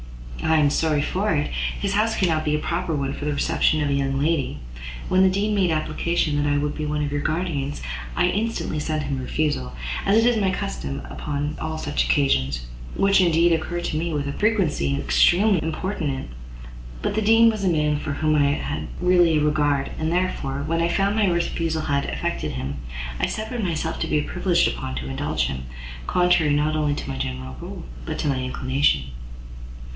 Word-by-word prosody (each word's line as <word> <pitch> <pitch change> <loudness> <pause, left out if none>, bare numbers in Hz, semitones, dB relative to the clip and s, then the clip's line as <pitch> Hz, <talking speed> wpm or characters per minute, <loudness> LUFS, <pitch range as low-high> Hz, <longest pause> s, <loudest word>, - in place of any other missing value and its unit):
"I 160 0 +3
am 145 -2 +4
sorry 150 -2 +1
for 195 +7 0
it; 145 0 -1 0.3
his 200 -1 -1
house 220 +2 +2
cannot 160 -4 +1
be 150 -1 +1
a - - 0
proper 170 +1 -2
one 140 -1 -1
for 145 - -6
the 150 - 0
reception 155 +1 +2
of 145 - 0
a - - +1
young 135 -1 0
lady. 155 -1 0 0.5
When 185 - +3
the 190 - +6
Dean 200 +3 0
made 195 -3 +2
application 155 0 0
that 145 0 +1
I 145 - +2
would 145 0 -1
be 155 - -3
one 150 0 -1
of 145 - -4
your 145 0 -1
guardians, 155 -4 -2 0.3
I - - +3
instantly 205 -4 -1
sent 155 0 -1
him 140 -2 -2
a - - -3
refusal, 130 - -1 0.3
as 220 +3 +4
is 240 -1 +4
my 200 -3 +2
custom 70 - -4
upon 145 +1 -3
all 160 0 -3
such 150 -1 0
occasions, 70 - +1 0.3
which 195 0 +4
indeed 170 -1 +4
occur 175 +2 -2
to 170 - -3
me 165 +2 -1
with 145 -2 -2
a 140 - -2
frequency 180 - +1
extremely 175 - +4
importunate: 160 - -3 0.7
but - - 0
the 220 - 0
Dean 225 +2 +6
was 215 -2 -4
a 190 - +3
man 150 -3 +1
for 145 - -3
whom 155 +1 +1
I 145 -1 +3
had 145 - -3
really 175 -3 +4
a 150 - +2
regard, 145 -2 +1
and, 160 +1 0
therefore, 145 -6 -1
when 165 +1 0
I 170 - +2
found 195 +3 +1
my 215 -2 +3
refusal 165 -2 0
had 140 -2 0
affected - - -3
him, 65 +2 -4 0.4
I - - +2
suffered 220 +2 -3
myself 160 -2 -2
to - - -1
be 150 - +2
prevailed 180 -1 +2
upon - - -4
to 65 0 -4
indulge 65 0 -1
him, 65 -1 -4 0.4
contrary 180 -4 +3
not 150 +1 +1
only 150 -2 +1
to - - -6
my 65 - -4
general 65 0 -4
rule, - - -7 0.2
but - - -3
to - - -1
my 135 -2 +1
inclination." 130 - +1
155 Hz, 200 wpm, -23 LUFS, 145-180 Hz, 0.7 s, the